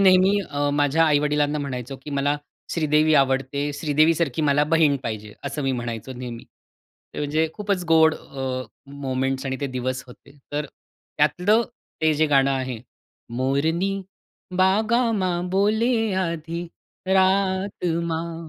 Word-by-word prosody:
नेहमी 190 +1 +5
अ, 145 0 0
माझ्या 145 +3 +3
आई-वडिलांना 150 0 +2
म्हणायचो, 135 -2 -5
की 150 - -7
"मला 145 +1 +1 0.4
श्रीदेवी 155 -1 +3
आवडते, 135 +1 +1
श्रीदेवीसारखी 155 -1 +2
मला 145 0 +3
बहीण 150 -3 +4
पाहिजे," 105 -2 -5
असं 140 +1 -3
मी 135 - 0
म्हणायचो 120 0 -4
नेहमी. 120 -2 -7 0.7
ते - - -6
म्हणजे 155 +2 0
खूपच 200 -4 -2
गोड 160 -1 +5
अ, 130 -1 -5 0.4
मोमेंट्स 130 +1 -1
आणि 130 0 -2
ते 140 - -1
दिवस 130 0 -3
होते. 140 +3 -16 0.2
तर 150 0 -1 0.5
त्यातलं 180 +10 +3 0.4
ते 160 -1 +4
जे 155 +1 +2
गाणं 140 -2 +3
आहे, 130 -3 -2 0.6
मोरनी 160 +9 +1 0.6
बागां 220 +5 +3
मां 180 -1 -1
बोले, 220 +3 +2
आधी 170 +1 -4 0.4
रात 190 0 +1 0.3
मां 165 0 -4
150 Hz, 130 wpm, -23 LUFS, 135-175 Hz, 0.7 s, नेहमी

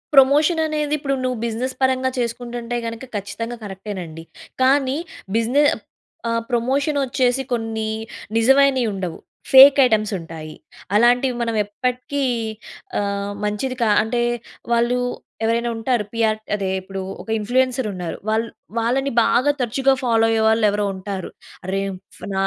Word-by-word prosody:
Promotion 295 +5 +5
అనేది 300 -1 -1
ఇప్పుడు 275 -1 -2
నువ్వు 255 -2 -1
బిజినెస్ 240 +3 -3
పరంగా 260 0 +2
చేసుకుంటుంటే 240 0 -3
గనుక 230 +2 -5
ఖచ్చితంగా 230 +4 -4
కరెక్టే 205 +1 -6
నండి. 165 -1 -8 0.4
కానీ 270 +1 +3 0.4
బిజినె 245 +6 +3 0.7
ఆహ్, 230 0 0
ప్రమోషన్ 270 +5 +1
వచ్చేసి 255 +1 +1
కొన్ని 225 -2 -2 0.5
నిజమైనవి 270 +2 +4
ఉండవు. 180 -4 -4 0.3
ఫేక్ 270 +1 +10
ఐటెమ్స్ 215 -2 +1
ఉంటాయి. 160 -2 -8 0.4
అలాంటివి 245 +3 +4
మనం 230 -1 -1
ఎప్పటికి 250 +6 -2 0.8
ఆహ్, 200 0 -2
మంచిది 210 +5 -2
కా 225 - +3
అంటే 240 +2 -1 0.5
వాళ్ళు 240 +1 +2 0.5
ఎవరైనా 235 +1 +1
ఉంటారు. 230 -1 0
పిఆర్ 220 -1 +1 0.2
అదే 195 -2 -2
ఇప్పుడు 195 +1 -6 0.2
ఒక - - -15
ఇన్‌ఫ్లూయెన్సర్ 255 +2 +1
ఉన్నారు. 180 -3 -5
వాల్ 220 +1 +1 0.3
వాళ్ళని 265 +4 0
బాగా 255 +5 +3
తరచుగా 265 +3 +2
ఫాలో 225 -2 +3
అయ్యేవాళ్ళు 220 0 +3
ఎవరో 205 0 0
ఉంటారు. 190 -1 -5 0.4
"అరె! 195 +1 -1 0.4
ఫన 200 - -6
235 Hz, 130 wpm, -21 LUFS, 215-260 Hz, 0.8 s, ఫేక్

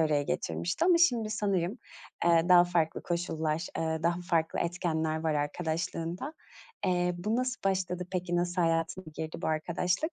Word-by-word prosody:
araya 150 -2 +2
getirmişti 180 - -1
ama 350 -2 +5
şimdi 235 -10 +3
sanırım, 200 0 0 0.5
eee, 170 0 +5
daha 175 -1 +8
farklı 170 -2 0
koşullar, 165 -1 -1
eee, 160 -1 -1
daha 170 +1 +1
farklı 160 -1 +1
etkenler 160 -2 -1
var 155 -1 +2
arkadaşlığında. 165 - -2 0.5
Eee, 180 -1 +1
bu 215 +6 0
nasıl 255 -1 -1
başladı, 180 -2 0
peki? 175 -1 -1
Nasıl 175 0 +1
hayatına 165 +2 0
girdi 160 -1 -4
bu - - -1
arkadaşlık? 175 - 0
175 Hz, 150 wpm, -30 LUFS, 160-185 Hz, 0.5 s, daha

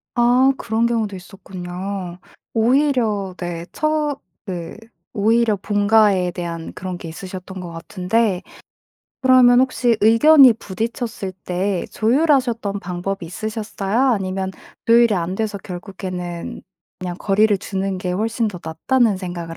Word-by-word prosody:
아 245 +3 +4
그런 225 +1 0
경우도 220 -4 -1
있었군요. 185 -1 -7 0.3
오히려 230 -5 +1
네 170 -1 -5
처 305 -2 -1 0.3
네 175 -4 -6 0.4
오히려 225 +1 +2
본가에 205 -2 +3
대한 170 -2 -6
그런 185 -1 -5
게 175 - -8
있으셨던 185 +2 -8
것 175 -2 -7
같은데 180 +4 -1 0.8
그러면 255 -1 +6
혹시 250 -3 +2
의견이 255 +5 +7
부딪혔을 225 -1 -4
때 185 +1 -1
조율하셨던 240 -5 +1
방법이 180 +1 -4
있으셨어요? 210 +2 -3
아니면 190 -2 -2 0.4
조율이 235 -1 +5
안 180 0 -2
돼서 215 -1 -2
결국에는 180 -2 -6 0.4
그냥 180 -1 -5
거리를 210 +1 +3
두는 195 0 -3
게 180 0 -3
훨씬 220 +4 0
더 185 -4 -7
낫다는 210 +7 +1
생각을 175 -3 -6
200 Hz, 280 characters per minute, -20 LUFS, 180-230 Hz, 0.8 s, 의견이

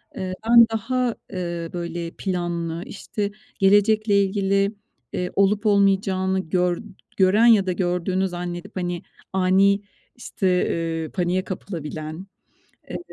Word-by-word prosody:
Eee, 185 -1 -4 0.2
ben 235 -1 +9
daha, 240 +2 -1 0.2
eee, 170 -2 -4
böyle 170 -1 -4
planlı, 175 -3 -3
işte, 205 0 -4 0.3
gelecekle 205 +1 +4
ilgili, 195 +1 +1 0.4
eee, 180 0 -2
olup 200 +2 +2
olmayacağını 195 -2 +2
gör 180 0 0 0.4
gören 195 +4 +5
ya 220 -5 +6
da - - +2
gördüğünü 180 +1 0
zannedip 175 +2 -6
hani 175 -2 -3 0.3
ani 190 +2 +3 0.3
işte, 220 -4 -3
eee, 165 -3 0
paniğe 185 0 0
kapılabilen. 160 -2 -6 0.6
Evet, - - -6
190 Hz, 115 wpm, -23 LUFS, 175-200 Hz, 0.6 s, ben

